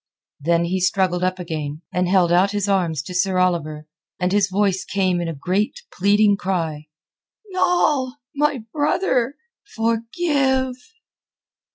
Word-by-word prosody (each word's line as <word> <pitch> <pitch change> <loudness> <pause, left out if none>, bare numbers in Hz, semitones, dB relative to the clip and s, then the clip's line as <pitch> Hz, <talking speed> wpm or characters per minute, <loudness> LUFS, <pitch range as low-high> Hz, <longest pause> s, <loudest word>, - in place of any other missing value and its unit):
Then 170 +3 +1
he 185 +2 -1
struggled 185 -1 +1
up 185 0 0
again, 155 -3 -5
and 180 0 +1
held 180 -3 +3
out 180 +3 +4
his 205 -1 -1
arms 170 -7 0
to 180 - -8
Sir 185 +1 +1
Oliver, 165 -4 0 0.3
and 180 0 0
his 200 -1 +2
voice 190 -1 +1
came 185 -2 0
in 170 - -2
a 165 - -4
great 200 - -1
pleading 205 +1 +3
cry. 165 -6 -2 0.6
"Noll! 300 -8 +1 0.2
My 285 -4 +1
brother! 290 -4 +1 0.4
Forgive!" 260 +3 0
190 Hz, 135 wpm, -21 LUFS, 175-230 Hz, 0.6 s, out